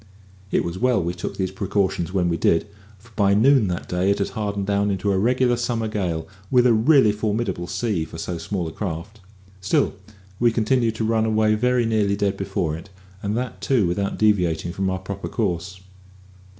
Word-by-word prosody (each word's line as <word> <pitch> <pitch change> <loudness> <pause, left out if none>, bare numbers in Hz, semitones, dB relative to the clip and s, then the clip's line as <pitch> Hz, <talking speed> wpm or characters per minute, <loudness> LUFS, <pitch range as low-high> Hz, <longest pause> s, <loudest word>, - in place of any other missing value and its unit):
It - - +1
was 85 +2 -4
well 125 -2 +3
we 85 -1 -2
took 90 - -6
these 95 -1 -1
precautions 95 -3 -1
when 90 -2 +1
we 85 - +1
did, 85 0 +2 0.3
for 110 +5 -20
by 100 -1 +3
noon 125 0 +5
that 90 -1 -3
day 90 +2 0
it 100 - +2
had 100 - -1
hardened 100 -2 -3
down 100 +1 +1
into 100 +1 0
a 95 - +1
regular 125 +3 +2
summer 120 -2 -1
gale, 90 -7 -2 0.2
with 125 -2 +4
a 120 - +5
really 115 0 +5
formidable 105 -3 -2
sea 95 -1 -1
for 80 - -9
so 85 +1 -4
small 90 +1 -3
a - - -5
craft. 95 +4 -5 0.4
Still, 95 +2 +1 0.5
we 120 0 +4
continued 115 0 +1
to 110 - -2
run 110 0 +2
away 110 -1 +2
very 125 +2 +2
nearly 105 -3 +1
dead 100 -1 0
before 85 -5 -2
it, 85 +5 -10 0.3
and 105 +2 -2
that 120 -6 -4
too 105 0 +2
without 100 +3 -1
deviating 90 -6 +1
from 95 0 -1
our 95 - -1
proper 95 0 -6
course. 90 +2 -3
100 Hz, 195 wpm, -23 LUFS, 90-110 Hz, 0.5 s, noon